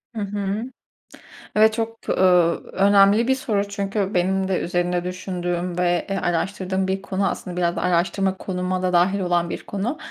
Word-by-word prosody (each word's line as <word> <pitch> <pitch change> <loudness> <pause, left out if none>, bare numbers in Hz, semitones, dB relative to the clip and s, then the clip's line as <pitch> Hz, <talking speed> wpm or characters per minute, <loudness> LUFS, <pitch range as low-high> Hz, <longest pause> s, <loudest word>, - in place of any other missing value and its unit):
HI - - -3
hı. 200 +1 -2 0.9
Evet, 220 +1 +5
çok, 225 0 -4
ööö, 180 -2 +4 0.2
önemli 200 +3 +5
bir 265 - +3
soru 205 -6 -1
çünkü 200 0 -2
benim 190 +1 +1
de 190 -1 0
üzerinde 175 0 -1
düşündüğüm 180 -1 -3
ve, 175 -1 +1
eee, 195 - -1
araştırdığım 190 +2 -1
bir 190 0 -1
konu, 195 0 -1
aslında 180 -2 -6
biraz 175 -1 +1
da - - -2
araştırma 185 +2 +1
konuma 180 0 -3
da 180 -1 0
dâhil 185 +3 +3
olan 175 -2 0
bir - - -6
konu. 215 +9 -3
190 Hz, 165 wpm, -22 LUFS, 180-200 Hz, 0.9 s, Evet